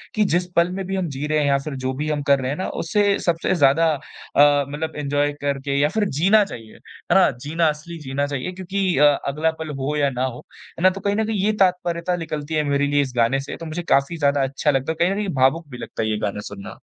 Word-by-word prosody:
कि, 215 Hz, -, +3 dB
जिस 180 Hz, -2 st, +1 dB
पल 170 Hz, +1 st, +4 dB
में 190 Hz, +1 st, -4 dB
भी 195 Hz, +1 st, -3 dB
हम 185 Hz, -2 st, -1 dB
जी 140 Hz, +1 st, -4 dB
रहे 155 Hz, 0 st, +1 dB
हैं 150 Hz, -, +1 dB
या 140 Hz, -1 st, +3 dB
फ़िर 140 Hz, +1 st, -5 dB
जो 130 Hz, -, 0 dB
भी 150 Hz, +3 st, -3 dB
हम 150 Hz, -1 st, -1 dB
कर 140 Hz, -1 st, +5 dB
रहे 130 Hz, +1 st, -2 dB
हैं 145 Hz, -, -3 dB
ना 185 Hz, -, -2 dB, 0.2 s
उसे 205 Hz, +3 st, +2 dB
सबसे 170 Hz, +2 st, 0 dB
ज़्यादा 160 Hz, +1 st, +4 dB
अ, 145 Hz, 0 st, +1 dB
मतलब 155 Hz, +3 st, -4 dB
एन्जॉय 145 Hz, 0 st, 0 dB
करके 140 Hz, -1 st, -1 dB
या 145 Hz, +1 st, +3 dB
फ़िर 210 Hz, +5 st, 0 dB
जीना 200 Hz, +7 st, +5 dB
चाहिए, 115 Hz, -, -10 dB
है -, -, -5 dB
ना? -, -, +6 dB
जीना 155 Hz, +7 st, -1 dB
असली 150 Hz, +3 st, -6 dB
जीना 140 Hz, 0 st, -2 dB
चाहिए 140 Hz, +4 st, -4 dB
क्योंकि 185 Hz, -1 st, -2 dB
अ, 150 Hz, -, +6 dB, 0.2 s
अगला 155 Hz, +4 st, 0 dB
पल 160 Hz, -1 st, -5 dB
हो 140 Hz, +3 st, -2 dB
या 145 Hz, -1 st, +2 dB
ना 125 Hz, -1 st, -3 dB
हो। 125 Hz, -2 st, -5 dB, 0.4 s
है -, -, -4 dB
ना? 185 Hz, -, +8 dB
तो 195 Hz, +1 st, -7 dB
कहीं 200 Hz, +1 st, 0 dB
न 220 Hz, +1 st, +1 dB
कहीं 220 Hz, -1 st, -2 dB
ये 215 Hz, -, +3 dB
तात्पर्यता 180 Hz, -2 st, +1 dB
निकलती 155 Hz, -2 st, -5 dB
है 155 Hz, -1 st, +2 dB
मेरे 140 Hz, 0 st, +2 dB
लिए 145 Hz, 0 st, +2 dB
इस 135 Hz, -3 st, -3 dB
गाने 120 Hz, +3 st, +2 dB
से 135 Hz, -, -6 dB
तो 165 Hz, -, -8 dB
मुझे 165 Hz, +2 st, -4 dB
काफ़ी 140 Hz, +5 st, +2 dB
ज़्यादा 140 Hz, -2 st, +2 dB
अच्छा 140 Hz, +3 st, 0 dB
लगता 135 Hz, +2 st, 0 dB
है। -, -, -4 dB
कहीं 175 Hz, +2 st, +3 dB
न -, -, -1 dB
कहीं 210 Hz, 0 st, -2 dB
भावुक 135 Hz, +5 st, +2 dB
भी 125 Hz, -, -8 dB
लगता 115 Hz, -, -5 dB
है 110 Hz, -, -1 dB
ये 110 Hz, -, 0 dB
गाना 105 Hz, 0 st, -3 dB
सुनना। 100 Hz, -1 st, -9 dB
150 Hz, 265 wpm, -22 LUFS, 140-175 Hz, 0.4 s, ना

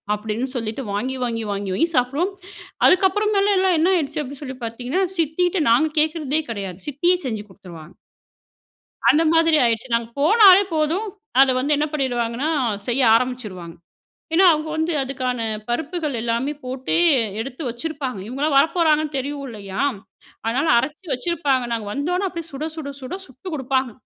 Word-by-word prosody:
அப்படின்னு 215 Hz, +4 st, -3 dB
சொல்லிட்டு 225 Hz, +2 st, -3 dB
வாங்கி, 255 Hz, +6 st, -2 dB
வாங்கி, 230 Hz, -2 st, -2 dB
வாங்கி, 200 Hz, -1 st, -3 dB
வாங்கி 330 Hz, -, +1 dB
சாப்பிடுவோம், 275 Hz, +10 st, +1 dB, 0.5 s
அதுக்கப்புறமேல 400 Hz, +2 st, +3 dB
எல்லாம் 375 Hz, -2 st, +3 dB
என்ன 355 Hz, +4 st, +3 dB
ஆயிடுச்சு 305 Hz, -2 st, -1 dB
அப்படின்னு 280 Hz, +2 st, -9 dB
சொல்லி 260 Hz, -1 st, -7 dB
பார்த்தீங்கன்னா, 250 Hz, +11 st, -2 dB
சித்திகிட்ட 335 Hz, +3 st, +1 dB
நாங்க 310 Hz, +5 st, +3 dB
கேட்கிறதே 310 Hz, -1 st, +1 dB
கிடையாது, 195 Hz, -4 st, -5 dB
சித்தியே 345 Hz, +6 st, +2 dB
செஞ்சு 220 Hz, -5 st, -3 dB
கொடுத்துருவாங்க. 175 Hz, -3 st, -13 dB, 1.2 s
அந்த 315 Hz, +2 st, +4 dB
மாதிரி 325 Hz, -1 st, +4 dB
ஆயிடுச்சு. 230 Hz, +1 st, 0 dB
நாங்க 230 Hz, 0 st, 0 dB
போனாலே 395 Hz, +3 st, +7 dB
போதும், 320 Hz, +8 st, 0 dB, 0.3 s
அத 270 Hz, -1 st, +6 dB
வந்து 295 Hz, +3 st, +1 dB
என்ன 300 Hz, +1 st, +1 dB
பண்ணீடுவாங்கன்னா? 250 Hz, 0 st, -1 dB, 0.4 s
செய்ய 250 Hz, +2 st, +1 dB
ஆரம்பிச்சுவாங்க. 215 Hz, -9 st, -2 dB, 0.6 s
ஏனா, 370 Hz, +3 st, +5 dB
அவங்க 310 Hz, 0 st, -2 dB
வந்து 320 Hz, +2 st, 0 dB
அதுக்கான 255 Hz, -2 st, -3 dB, 0.3 s
பருப்புகள் 305 Hz, +3 st, -2 dB
எல்லாமே 235 Hz, +5 st, -1 dB
போட்டு 255 Hz, +1 st, -3 dB, 0.5 s
எடுத்து 265 Hz, +5 st, -6 dB
வச்சிருப்பாங்க, 260 Hz, -2 st, -4 dB
இவங்களலாம் 275 Hz, +4 st, -1 dB
வரப்போறாங்கன்னு 310 Hz, -2 st, +2 dB
தெரியும் 280 Hz, +1 st, -4 dB
இல்லையா? 200 Hz, -4 st, -6 dB, 0.7 s
அதனால, 260 Hz, +7 st, 0 dB
அரைச்சி 305 Hz, +8 st, -4 dB
வச்சிருப்பாங்க, 275 Hz, -2 st, 0 dB
நாங்க 225 Hz, -3 st, -3 dB
வந்தோனே, 355 Hz, -, -1 dB
அப்டியே 335 Hz, -2 st, -7 dB
சுட 290 Hz, +3 st, -4 dB
சுட 295 Hz, -3 st, -5 dB
சுட 260 Hz, +5 st, -6 dB
சுட்டு 300 Hz, +6 st, -8 dB
கொடுப்பாங்க. 265 Hz, -3 st, -1 dB
275 Hz, 140 wpm, -21 LUFS, 240-320 Hz, 1.2 s, போனாலே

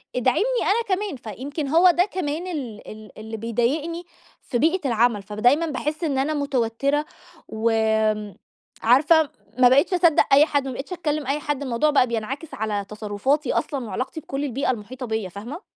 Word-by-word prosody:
ادعمني 255 Hz, -, +2 dB, 0.2 s
أنا 410 Hz, -2 st, +1 dB
كمان، 405 Hz, -5 st, -4 dB, 0.2 s
فيمكن 280 Hz, +3 st, -4 dB
هو 340 Hz, +5 st, +6 dB
ده 355 Hz, +2 st, +2 dB
كمان 350 Hz, -2 st, -3 dB
ال 260 Hz, -, -6 dB
ال 215 Hz, -2 st, -10 dB
اللي 220 Hz, +1 st, -6 dB
بيضايقني 270 Hz, +10 st, -1 dB, 0.4 s
في 240 Hz, -, -2 dB
بيئة 320 Hz, +2 st, +1 dB
العمل، 230 Hz, -3 st, +2 dB
فدايمًا 245 Hz, -, +2 dB
باحِسّ 305 Hz, +2 st, -3 dB
إن 280 Hz, -4 st, 0 dB
أنا 290 Hz, +4 st, 0 dB
متوتّرة 280 Hz, +1 st, 0 dB, 0.4 s
وآمم، 220 Hz, -2 st, 0 dB, 0.5 s
عارفة 290 Hz, +6 st, +5 dB, 0.3 s
ما 250 Hz, -1 st, +7 dB
بقيتش 280 Hz, +8 st, +3 dB
أصدَّق 340 Hz, -3 st, +4 dB
أي 290 Hz, +2 st, +7 dB
حد، 285 Hz, -3 st, -1 dB
ما 260 Hz, -, -4 dB
بقيتش 280 Hz, +8 st, -6 dB
أتكلِّم 305 Hz, -5 st, -2 dB
أي 285 Hz, +2 st, 0 dB
حد، 290 Hz, -1 st, -3 dB
الموضوع 255 Hz, +4 st, +1 dB
بقى 275 Hz, -4 st, +4 dB
بينعكس 240 Hz, +7 st, -4 dB
على 205 Hz, -2 st, -2 dB
تصرُّفاتي 215 Hz, +7 st, -1 dB
أصلًا 275 Hz, -5 st, -2 dB
وعلاقتي 260 Hz, +8 st, -4 dB
بكُلّ 280 Hz, -2 st, -5 dB
البيئة 270 Hz, 0 st, 0 dB
المُحيطة 250 Hz, +3 st, -6 dB
بيّا، 220 Hz, -4 st, -3 dB
فاهمة؟ 235 Hz, -, -8 dB
270 Hz, 165 wpm, -23 LUFS, 225-305 Hz, 0.5 s, ما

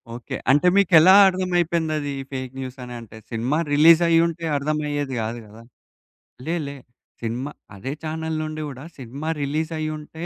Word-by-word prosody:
Okay. 120 Hz, -, -6 dB, 0.2 s
అంటే, 145 Hz, +6 st, +4 dB
మీకెలా 185 Hz, -2 st, +6 dB
అర్థమైపోయిందది 170 Hz, -5 st, 0 dB, 0.2 s
fake 130 Hz, -1 st, -5 dB
news 130 Hz, 0 st, -6 dB
అని? 125 Hz, 0 st, -8 dB
అంటే 110 Hz, -1 st, -12 dB
సినిమా 120 Hz, +6 st, -1 dB, 0.2 s
రిలీజ్ 160 Hz, +3 st, +7 dB
అయ్యుంటే 170 Hz, 0 st, +2 dB
అర్థమయ్యేది 145 Hz, -1 st, -2 dB
గాదు 115 Hz, +2 st, -4 dB
గదా! 110 Hz, +2 st, -14 dB, 0.8 s
లే, 165 Hz, +2 st, -1 dB
లే. 140 Hz, -, -6 dB, 0.5 s
సినిమా 120 Hz, +5 st, -3 dB, 0.2 s
అదే 120 Hz, +8 st, -5 dB
ఛానెల్ 160 Hz, 0 st, -3 dB
నుండి 155 Hz, 0 st, -5 dB
గూడా 135 Hz, -1 st, -9 dB
సినిమా 135 Hz, +4 st, -7 dB
రిలీజ్ 155 Hz, +3 st, -2 dB
అయ్యుంటే, 155 Hz, +1 st, -5 dB
150 Hz, 140 wpm, -23 LUFS, 130-160 Hz, 0.8 s, రిలీజ్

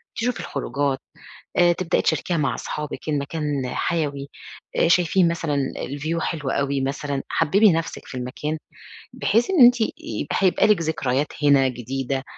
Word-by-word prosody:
تشوفي 245 Hz, +1 st, -1 dB
الخروجات 140 Hz, -1 st, -2 dB, 0.6 s
آآ 175 Hz, -1 st, +6 dB
تبدئي 185 Hz, 0 st, 0 dB
تشاركيها 175 Hz, -2 st, 0 dB
مع 140 Hz, -2 st, 0 dB
أصحابِك 150 Hz, +1 st, -5 dB
إن 145 Hz, -2 st, +1 dB
مكان 145 Hz, -2 st, -2 dB
حيوي، 145 Hz, -4 st, -2 dB, 0.5 s
آآ -, -, +4 dB
شايفين 175 Hz, +1 st, +4 dB
مثلًا 160 Hz, -3 st, -1 dB, 0.2 s
الview 155 Hz, +5 st, -3 dB
حلو 150 Hz, -5 st, -2 dB
أوي 140 Hz, -1 st, 0 dB
مثلًا، 140 Hz, +1 st, -2 dB
حببي 195 Hz, +6 st, +4 dB
نفْسِك 165 Hz, 0 st, -3 dB
في -, -, -8 dB
المكان 140 Hz, +5 st, -4 dB, 0.6 s
بحيث 230 Hz, -, +1 dB
إن 350 Hz, -8 st, +4 dB
أنتِ 245 Hz, -1 st, +5 dB
آآ 220 Hz, -, +3 dB, 0.5 s
هيبقى 190 Hz, +1 st, +3 dB
لِك 210 Hz, -5 st, +3 dB
ذكريات 150 Hz, -3 st, 0 dB, 0.2 s
هنا 140 Hz, -2 st, +5 dB
جديدة، 130 Hz, +2 st, -3 dB
150 Hz, 145 wpm, -23 LUFS, 140-170 Hz, 0.6 s, آآ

